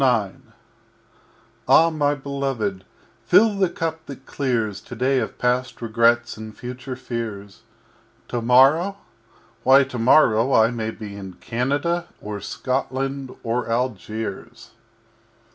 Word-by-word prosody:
IX 115 -7 +2 1.3
Ah, 165 +1 +6
my 145 -2 +1
Beloved, 135 -9 -3 0.4
fill 220 0 +5
the 190 -2 +3
Cup 160 -1 -4
that 135 -1 -10
clears 115 -7 -2
TODAY 130 +2 0
of 110 - -4
past 125 0 -1
Regrets 115 +1 +2
and 110 0 -9
future 125 +1 -7
Fears 115 -5 -6 0.7
Tomorrow! 135 +11 +4 0.6
Why, 135 +3 +6
Tomorrow 125 0 +3
I 110 +1 +5
may 110 -2 -3
be 105 -2 -8
In 95 -2 -8
Canada 140 - -1
or 105 -1 -6
Scotland 135 +2 -3
or 115 0 -2
Algiers! 115 -3 -4
125 Hz, 110 wpm, -22 LUFS, 110-135 Hz, 1.3 s, Ah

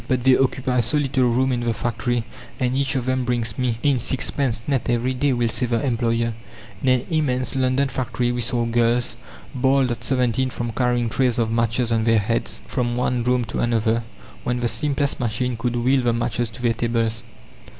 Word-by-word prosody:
"But 130 -2 0
they 130 0 +6
occupy 130 -1 +1
so 120 +6 +2
little 130 -3 +1
room 130 +3 +2
in 125 - 0
the 120 -2 -1
factory, 120 +1 -1 0.4
and 125 0 0
each 135 0 0
of 130 -2 -1
them 130 0 0
brings 120 -2 -2
me 125 -3 0
in 140 -3 +3
sixpence 125 -1 +1
net 135 -5 0
every 120 +2 +1
day," 140 +2 +1
will 120 -2 +1
say 125 +2 0
the 115 -1 0
employer. 115 -2 0 0.5
In 130 - +1
an 130 -1 +2
immense 130 -6 0
London 130 +1 +2
factory 125 -2 -2
we 120 0 -2
saw 120 0 0
girls, 120 -1 +1 0.4
bald 130 0 +2
at 120 - -4
seventeen 130 -1 +1
from 120 -1 -4
carrying 120 0 +1
trays 125 +1 +1
of 115 -2 0
matches 115 +1 0
on 110 -1 +1
their 115 -1 +4
heads 110 +3 -1
from 120 -2 -2
one 125 -1 0
room 125 0 +1
to 115 - -4
another, 115 -1 +1 0.4
when 125 0 -1
the 120 - +1
simplest 140 +5 0
machine 120 +1 -1
could 120 +1 -2
wheel 130 +3 +2
the 120 -1 +1
matches 120 0 -1
to 120 +2 -10
their 120 -1 +3
tables. 115 -1 -1
120 Hz, 200 wpm, -22 LUFS, 115-130 Hz, 0.5 s, they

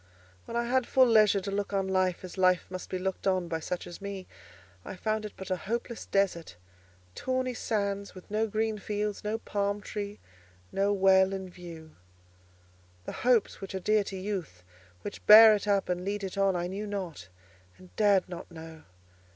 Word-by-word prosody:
When 235 - -4
I 235 - +1
had 255 0 +1
full 260 -1 +5
leisure 215 -4 +5
to 200 +1 -4
look 200 0 -2
on 195 -1 0
life 185 -1 0
as 185 - -8
life 185 -1 +3
must 185 0 -6
be 185 - -2
looked 190 +1 -3
on 185 -2 +1
by 165 -1 -2
such 175 +2 -4
as 175 - -10
me, 200 -2 -6 0.6
I - - -7
found 215 +3 -2
it 210 - -7
but 190 -1 -7
a - - +3
hopeless 235 +5 -4
desert: 190 - 0 0.6
tawny 255 - -1
sands, 200 -4 -2
with 185 +2 -13
no 220 +1 +1
green 215 0 -1
fields, 210 0 -3
no 210 +1 -1
palm 205 -2 -2
tree, 205 0 -6 0.5
no 200 +1 +1
well 190 -1 +4
in 190 -1 -5
view. 165 -3 -11 1.1
The - - -4
hopes 240 -5 +2
which 195 0 -6
are - - -1
dear 215 +2 +2
to 195 - -6
youth, 185 - -5 0.4
which 205 - -7
bear 220 +1 +11
it 210 0 -2
up 200 -1 +2
and 180 0 -2
lead 200 +1 -3
it 190 0 -4
on, 195 -1 +2
I 175 0 -1
knew 195 +4 -4
not 180 - -5 0.5
and 185 -1 -17
dared 205 -3 +3
not 175 -1 -8
know. 160 -1 -11
195 Hz, 190 wpm, -29 LUFS, 185-210 Hz, 1.1 s, bear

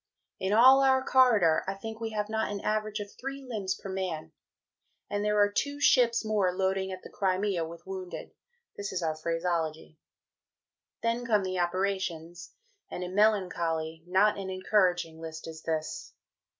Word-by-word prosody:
In 190 +1 -1
all 260 +5 +7
our 265 -1 +4
corridor, 220 -11 +4
I 195 - -2
think 220 +3 -7
we 225 -1 -3
have 210 -1 -2
not 220 -1 -1
an 205 - -3
average 215 0 -1
of 205 -1 -6
three 275 +1 -7
Limbs 200 -6 -2
per - - -10
man. 180 -5 -4 0.8
And 205 0 -1
there 210 0 +1
are 205 0 +4
two 285 +6 -2
Ships 240 -4 +4
more 205 -4 +2
"loading" 190 +1 -1
at 185 0 -7
the - - -10
Crimea 190 -2 0
with 170 0 -11
wounded 190 -1 -7 0.4
(this 200 0 -5
is 185 -2 -2
our 160 -1 0
Phraseology). 165 -1 -2 1.0
Then 230 +1 0
come 215 -4 +2
the 185 -1 -2
operations, 175 -2 -2 0.4
and 180 - -5
a 180 - -4
melancholy, 170 -6 +1
not 200 +3 +3
an 190 -1 -5
encouraging 185 -4 +1
List 160 0 -7
is 160 -1 -8
this. 160 -1 -4
190 Hz, 165 wpm, -29 LUFS, 175-215 Hz, 1.0 s, all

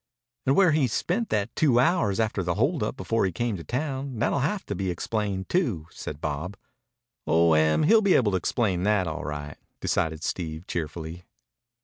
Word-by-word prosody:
"And 135 - +4
where 190 -4 +5
he 150 -4 +3
spent 190 - -1
that 105 +1 -1
two 135 -6 +4
hours 125 - +2
after 110 -3 0
the 85 -1 -1
hold 140 - +1
up - - -2
before 115 -4 0
he 95 - +1
came 115 +5 -1
to 85 - -8
town. 135 - -3
That'll 120 +5 +1
have 180 +9 -1
to - - -3
be 95 0 -2
explained 95 +1 -2
too," 120 - 0
said 75 - -7
Bob. 80 +6 -4 0.7
"Oh, 85 0 +4
Em 80 - +3
he'll 220 +8 +6
be 200 -3 +4
able 110 -5 +3
to 95 - +2
explain 95 -2 0
that 100 -1 +2
all 80 -2 -4
right," 75 -1 -5 0.2
decided 80 -1 -1
Steve 80 -1 -4
cheerfully. 80 +1 -5
100 Hz, 190 wpm, -26 LUFS, 85-135 Hz, 0.7 s, he'll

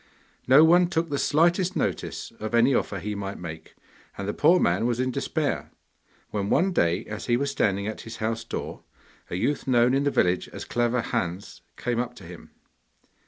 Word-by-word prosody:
No 135 +4 +8
one 175 +2 +5
took 165 -2 -1
the 140 - 0
slightest 175 +4 +2
notice - - -3
of 110 +2 -3
any 120 +4 +4
offer 100 - 0
he 105 +3 -4
might 100 -1 -5
make, 80 -2 -9 0.4
and 100 - -4
the 105 - -1
poor 170 +4 +4
man 95 +7 +2
was 120 0 -1
in 130 0 0
despair, - - -2 0.6
when 100 -1 -2
one 190 +1 +2
day, 85 - +1
as 110 0 -7
he 120 -1 +3
was 140 +2 -1
standing 100 -6 0
at 110 +1 -5
his 115 0 -8
house 115 +1 -2
door, - - -6 0.5
a - - -4
youth 140 +11 -1
known 125 0 +4
in 135 +1 +2
the 145 - +2
village 90 -9 +1
as - - -8
Clever 120 0 0
Hans 90 -2 -4 0.2
came 120 -1 -1
up 120 0 -3
to 100 - -13
him. 85 0 -11
120 Hz, 195 wpm, -25 LUFS, 100-140 Hz, 0.6 s, No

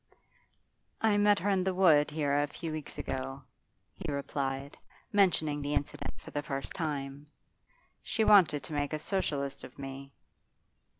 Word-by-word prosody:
'I 215 -2 +4
met 205 0 +5
her 200 +3 0
in 190 -2 +2
the 190 -1 0
wood 160 -6 +5
here 150 -2 0
a 145 +1 +2
few 165 +2 -6
weeks 155 -2 -6
ago,' 135 +1 -4 0.5
he 175 -6 -5
replied, 140 0 -3 0.4
mentioning 160 -7 +2
the 145 +1 -1
incident 145 - -3
for - - -11
the 145 - -1
first 140 -2 -4
time. 145 -3 -4 0.7
'She 225 - 0
wanted 170 -10 +6
to 145 - -7
make 145 0 -1
a - - +1
Socialist 145 -7 -2
of 125 - -11
me. 135 0 -7
145 Hz, 155 wpm, -31 LUFS, 140-180 Hz, 0.7 s, wanted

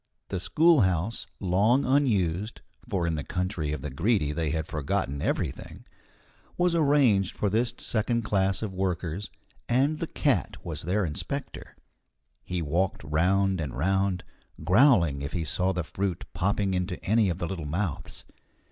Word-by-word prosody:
The 95 - -2
schoolhouse, 115 - +2
long 105 +8 +2
unused 110 - +1 0.3
(for 95 -6 0
in 85 - 0
the 75 -2 -3
country 90 -4 -2
of 75 -3 -4
the 75 0 -5
Greedy 80 - +1
they 80 0 -1
had 80 0 -1
forgotten 70 -2 -2
everything), - - -3 0.7
was 175 -1 +2
arranged 140 - +3
for 105 - 0
this 115 +2 +1
second 115 +1 0
class 100 -1 +1
of 100 -3 -4
workers, 95 0 -2 0.4
and 140 +6 +2
the 165 - -2
cat 135 - 0
was 80 -3 -4
their 95 +4 0
inspector. 75 -3 -5 0.7
He 90 -2 -3
walked 85 +5 -1
round 90 +5 +1
and 70 -5 -4
round, 95 +3 +1 0.4
growling 90 - +4
if 70 - -5
he 85 - -1
saw 90 +4 +1
the 90 -2 -2
fruit 95 +2 -3
popping 100 0 0
into 90 0 -2
any 110 0 +3
of 85 - -2
the 85 - -3
little 85 -4 -4
mouths. 85 0 -4
95 Hz, 150 wpm, -27 LUFS, 85-110 Hz, 0.7 s, growling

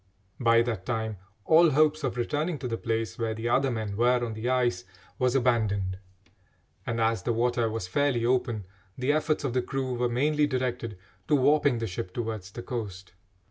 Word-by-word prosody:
By 115 -2 +5
that 110 -6 -4
time 110 -3 -2 0.3
all 165 +1 +6
hopes 155 +1 +3
of 125 -3 -2
returning 150 +7 -1
to 125 - -4
the 115 - -2
place 115 0 -2
where 110 -1 -1
the 110 +1 -3
other 135 +3 +3
men 110 -4 -3
were 120 +2 +3
on 115 - -4
the 110 +3 -3
ice 120 -8 +1 0.4
was 125 0 +2
abandoned, 105 -7 +1 0.9
and, 115 0 -1
as 115 0 +1
the 120 - -1
water 120 0 +1
was 110 -4 -4
fairly 125 +2 +1
open, 120 -4 0 0.3
the 130 +3 +1
efforts 155 0 0
of 135 -4 -1
the 130 - +2
crew 130 0 -3
were 120 0 0
mainly 150 +5 +2
directed 125 -5 -2 0.3
to 150 - +4
warping 145 -1 +3
the 115 - -2
ship 90 -2 -5
towards 110 -5 -4
the 120 +4 -8
coast. 100 -6 -6
120 Hz, 185 wpm, -27 LUFS, 110-130 Hz, 0.9 s, all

